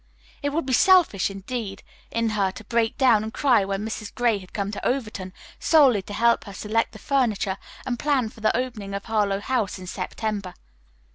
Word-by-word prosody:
It 285 - 0
would 300 +1 -1
be 260 - -1
selfish, 345 - +5
indeed, 195 0 -5 0.3
in 230 0 0
her 205 -3 +1
to 225 - -10
break 230 +1 0
down 245 -6 +5
and 220 +1 -4
cry 245 -5 +3
when 195 +2 -2
Mrs. 215 -1 -5
Gray 235 -4 +2
had 185 -1 -14
come 200 -1 -2
to 210 - -6
Overton 215 -7 -2 0.3
solely 275 -10 +5
to 205 - -9
help 235 +2 +3
her 200 - -9
select 220 +3 -1
the - - -9
furniture 215 -6 0 0.3
and 245 -2 -2
plan 275 -6 +1
for 220 - -16
the 215 +1 +2
opening 220 -6 -4
of 200 - -5
Harlowe 205 -3 +1
House 220 -4 -1
in 185 - -9
September. 195 +1 -4
220 Hz, 195 wpm, -24 LUFS, 200-245 Hz, 0.3 s, selfish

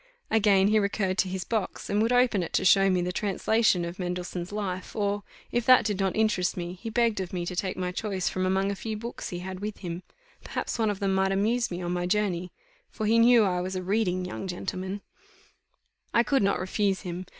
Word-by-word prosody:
Again 200 -3 +4
he 215 0 +4
recurred 200 -1 0
to 195 - +2
his 185 0 -3
box, 220 -1 -3
and 205 +1 +1
would 225 +2 +2
open 245 -5 +3
it 170 - -5
to - - +1
show 195 +1 +6
me 180 -2 +2
the 180 - -1
translation 205 -1 +1
of 170 +2 -7
Mendelssohn's 180 0 -4
Life; 190 -3 -4
or, 205 -1 0 0.3
if 240 - +1
that 255 -3 +7
did 205 -2 -1
not 195 -1 0
interest 215 -5 +1
me, 175 0 -4
he 230 - -4
begged 230 -2 +1
of 185 -2 -4
me 175 -2 -3
to 180 - -4
take 185 0 -2
my 180 -1 -2
choice 190 -1 -2
from 185 - -1
among 190 +1 +1
a - - -3
few 215 +2 -4
books 235 +3 -6
he 175 - -5
had 190 -1 -6
with 210 +1 -5
him; 175 -1 -5 0.4
perhaps - - -4
one 220 -1 +2
of 205 -1 -3
them 195 -1 +1
might 190 0 +2
amuse 225 +5 +1
me 175 0 -5
on 175 - -2
my 180 0 -1
journey, 185 -3 0 0.4
for 220 - -4
he 225 +2 +4
knew 235 -1 +6
I 180 -3 +1
was 185 +1 -4
a 185 - -3
reading 185 -2 0
young 185 +1 -5
gentleman. 190 +2 -4 1.1
I 235 - +6
could 275 +2 +2
not 200 0 +2
refuse 190 +1 0
him. 180 -1 -6
195 Hz, 230 wpm, -27 LUFS, 180-215 Hz, 1.1 s, that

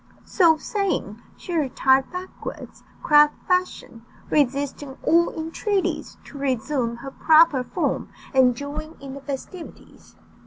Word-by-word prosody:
So 335 -5 +4
saying, 350 - -2 0.2
she 355 - -7
retired 265 -3 +2
backwards, 365 +1 -8 0.2
crab 295 0 +6 0.2
fashion, 360 -10 -1 0.3
resisting 280 -1 0
all 340 +1 +4
entreaties 370 +5 -2
to 280 - -11
resume 255 -2 -1
her 270 +3 -9
proper 310 -3 +4
form - - -2 0.2
and 255 -2 +4
join 290 +3 -7
in 275 -1 -8
the 275 - -9
festivities. 285 +6 -9
285 Hz, 115 wpm, -23 LUFS, 265-330 Hz, 0.3 s, crab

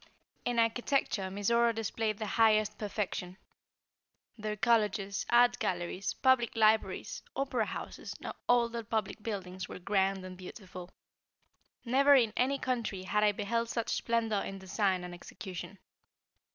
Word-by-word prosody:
In 245 -1 0
architecture 230 -3 +1
Mizora 230 +4 +2
displayed 220 -1 -1
the 215 - -3
highest 215 -1 +3
perfection. 195 -3 -3 1.0
Their 215 -1 -3
colleges, 210 -3 +1
art 240 +1 +5
galleries, 180 +2 -2
public 260 -3 +3
libraries, 220 0 +2
opera 260 -5 0
houses, - - -6
and - - -6 0.2
all 240 -1 +5
their 235 0 -4
public 220 0 -2
buildings 190 -4 -5
were - - -7
grand 190 0 0
and 185 0 -8
beautiful. 180 -1 -10 1.0
Never 275 +4 +5
in 230 -5 +3
any 265 +3 +2
country, 235 -8 -2
had 210 +3 +1
I 210 - +5
beheld 230 +3 -1
such 230 -1 -2
splendor 225 -3 0
in 195 - -6
design 190 -1 0
and 180 0 -7
execution. 180 +1 -8
215 Hz, 135 wpm, -31 LUFS, 195-235 Hz, 1.0 s, art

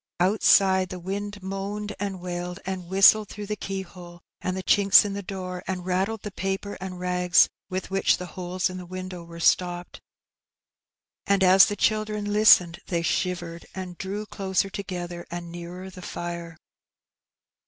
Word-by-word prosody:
Outside, 190 0 +4
the 185 - -6
wind 200 +2 -5
moaned 200 +2 -4
and 195 -2 -3
wailed, 180 0 -5
and 190 -2 -4
whistled 195 +2 +6
through 210 0 -7
the 210 +1 -3
keyhole 185 -3 -7 0.2
and 185 0 -2
the 190 - -4
chinks 200 +1 +6
in 200 - -3
the 200 - -4
door, 185 -2 -6
and 185 -2 -3
rattled 190 +4 -1
the 210 - -5
paper 195 +2 -3
and 185 -1 -6
rags 180 -1 +4 0.2
with 185 +1 -4
which 195 0 +3
the 180 - -6
holes 180 +1 -2
in 185 -1 -6
the 180 -1 -8
window 185 -1 -7
were 170 0 -11
stopped. 175 +1 +1 1.3
And 200 -1 +3
as 190 +1 +7
the 205 - -2
children 215 -1 0
listened 180 -5 +6
they 170 -3 -1
shivered, 170 -1 -2
and 185 -2 -6
drew 200 +4 -5
closer 195 -1 -1
together, 175 -3 -6
and 175 -1 -6
nearer 175 +2 -8
the 185 - -11
fire. 170 -2 -6
185 Hz, 160 wpm, -25 LUFS, 180-195 Hz, 1.3 s, as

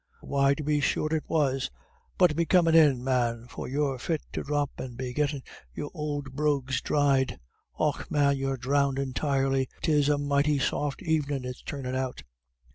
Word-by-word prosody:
"Why 140 0 +2
tub 150 - -6
be 150 0 +2
sure 155 +2 0
it 155 - -1
was. 135 -4 +1 0.5
But 180 -5 +4
be 170 +1 0
comin' 170 -3 +4
in, 145 -6 +5
man, 120 -3 0
for - - -7
you're 135 -1 -1
fit 160 +4 -2
to - - -2
dhrop, 145 -1 -1
and 125 -2 -6
be 125 -1 -4
gettin' 145 -1 -1 0.3
your 145 - -5
ould 145 -3 -4
brogues 140 -3 0
dhried. 140 -3 +2 0.4
Och - - 0
man, 140 -1 +3
you're 135 0 -2
dhrownded 140 +1 +1
entirely; 135 -1 0
'tis 150 -2 +3
a 145 - +3
mighty 145 +1 +2
soft 140 +1 -1
evenin' 145 -5 0
it's 125 0 -6
turnin' 135 -3 -5
out." 130 -1 -3
140 Hz, 170 wpm, -28 LUFS, 130-150 Hz, 0.5 s, in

